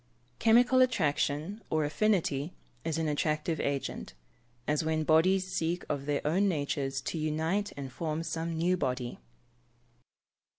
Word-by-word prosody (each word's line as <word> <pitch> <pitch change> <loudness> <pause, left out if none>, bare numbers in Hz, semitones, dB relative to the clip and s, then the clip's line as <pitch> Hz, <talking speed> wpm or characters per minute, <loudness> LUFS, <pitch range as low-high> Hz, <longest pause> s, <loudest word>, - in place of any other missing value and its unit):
_ - - -38
Chemical 245 +3 +5
attraction, 165 - +1
or 155 -1 +1
affinity, 160 -3 +1 0.3
is 165 -1 -1
an 160 -1 0
attractive 155 +1 0
agent 140 - -3 0.5
as 150 +1 +1
when 155 0 0
bodies 185 +5 +4
seek 175 -1 -2
of 140 -1 -2
their 145 -1 -1
own 185 +7 +3
natures 140 -5 -1
to 160 - -3
unite 160 +7 0
and 135 -2 -6
form 160 -1 -2
some 165 0 -3
new 175 +3 +2
body. 125 -7 -2
160 Hz, 135 wpm, -30 LUFS, 145-180 Hz, 0.5 s, Chemical